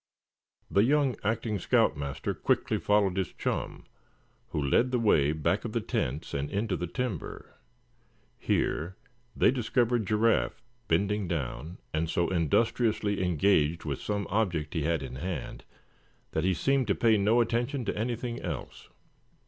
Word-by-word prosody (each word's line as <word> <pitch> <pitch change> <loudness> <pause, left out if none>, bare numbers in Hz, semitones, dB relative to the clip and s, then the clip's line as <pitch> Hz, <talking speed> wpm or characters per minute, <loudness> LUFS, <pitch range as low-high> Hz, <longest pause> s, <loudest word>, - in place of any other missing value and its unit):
The 100 - +4
young 140 0 +3
acting 110 -1 -1
scout - - +3
master 70 0 -3
quickly - - 0
followed 100 -3 +2
his 95 -2 -1
chum, - - -3 0.6
who - - -3
led 75 - +2
the 125 - +1
way 80 -11 +3
back 75 -1 0
of - - -5
the - - +1
tents 70 +5 -3
and 70 +1 -2
into 100 -1 -1
the 90 - -3
timber. 110 -1 -5 0.9
Here 85 +5 0 0.4
they - - +4
discovered 120 -3 +1
Giraffe, 110 +1 +2 0.3
bending 105 -1 +1
down, 80 0 -4 0.2
and 80 +1 0
so 85 +1 +1
industriously 105 - +1
engaged 85 -2 +2
with 70 -3 -3
some 105 -1 -2
object 90 -7 0
he 80 - -1
had 80 0 0
in 65 -1 -7
hand 85 -2 -5 0.7
that 80 +2 -1
he 95 -1 +2
seemed 135 +2 +1
to 100 - +2
pay 115 -2 +4
no 105 +3 +3
attention 120 +3 0
to - - -2
anything 120 +2 -3
else. 80 -9 -6
100 Hz, 150 wpm, -29 LUFS, 80-115 Hz, 0.9 s, The